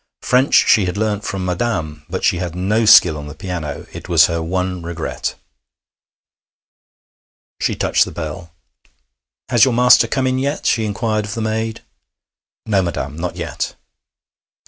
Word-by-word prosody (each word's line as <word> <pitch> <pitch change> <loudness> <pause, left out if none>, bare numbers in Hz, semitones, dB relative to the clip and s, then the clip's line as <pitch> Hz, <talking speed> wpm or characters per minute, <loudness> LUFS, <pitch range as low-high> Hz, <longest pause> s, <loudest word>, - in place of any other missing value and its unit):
French 130 +2 +3
she 105 -4 +5
had 90 +2 -3
learned 105 -1 -1
from 95 -2 -4
'Madame,' 85 -6 -3
but 95 +2 -4
she 90 - +2
had 85 -1 -4
no 105 +5 0
skill 85 -6 +7
on 75 - -8
the 75 - -9
piano; 80 -4 -5
it - - -9
was 80 -2 +6
her 85 0 -2
one 90 +2 -2
regret. 85 -1 -4 2.2
She - - 0
touched - - +2
the - - -8
bell. 80 +2 -7 1.0
'Has 120 -3 +4
your 130 -3 +3
master 125 -1 +6
come 130 +3 -1
in 130 0 0
yet?' 140 +3 -2
she 110 -1 +2
inquired 110 +1 -1
of 105 - -6
the 115 - -3
maid. 110 +1 -2 0.8
'No, 100 -3 +2
madam, 75 -5 -4
not 85 +2 -4
yet.' - - -4
95 Hz, 155 wpm, -18 LUFS, 85-110 Hz, 2.2 s, skill